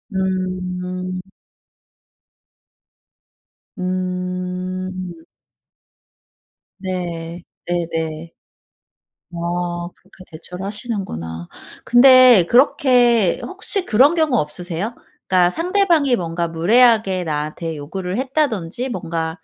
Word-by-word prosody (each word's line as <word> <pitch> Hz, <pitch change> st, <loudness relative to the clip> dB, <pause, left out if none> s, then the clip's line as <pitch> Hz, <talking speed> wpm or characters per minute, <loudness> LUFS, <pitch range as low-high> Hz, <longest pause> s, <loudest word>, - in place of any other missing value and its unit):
음. 185 Hz, -1 st, -3 dB, 2.6 s
음. 185 Hz, 0 st, -4 dB, 1.7 s
네. 175 Hz, -2 st, -5 dB, 0.2 s
네네. 165 Hz, -2 st, -3 dB, 1.0 s
어 175 Hz, 0 st, -3 dB
그렇게 190 Hz, 0 st, -18 dB
대처를 180 Hz, +4 st, -8 dB
하시는구나. 190 Hz, -, -5 dB, 0.4 s
근데 255 Hz, -4 st, +7 dB
그렇게 245 Hz, -, +4 dB
혹시 385 Hz, 0 st, 0 dB
그런 275 Hz, +8 st, +4 dB
경우 310 Hz, -6 st, +2 dB
없으세요? 175 Hz, +7 st, -4 dB, 0.3 s
그러니까 180 Hz, -2 st, +4 dB
상대방이 335 Hz, -, +2 dB
뭔가 170 Hz, -3 st, -3 dB
무례하게 195 Hz, +2 st, +3 dB
나한테 155 Hz, +1 st, -3 dB
요구를 180 Hz, +6 st, -5 dB
했다든지 255 Hz, -, -1 dB
뭔가 165 Hz, -5 st, -4 dB
185 Hz, 180 characters per minute, -19 LUFS, 170-235 Hz, 2.6 s, 근데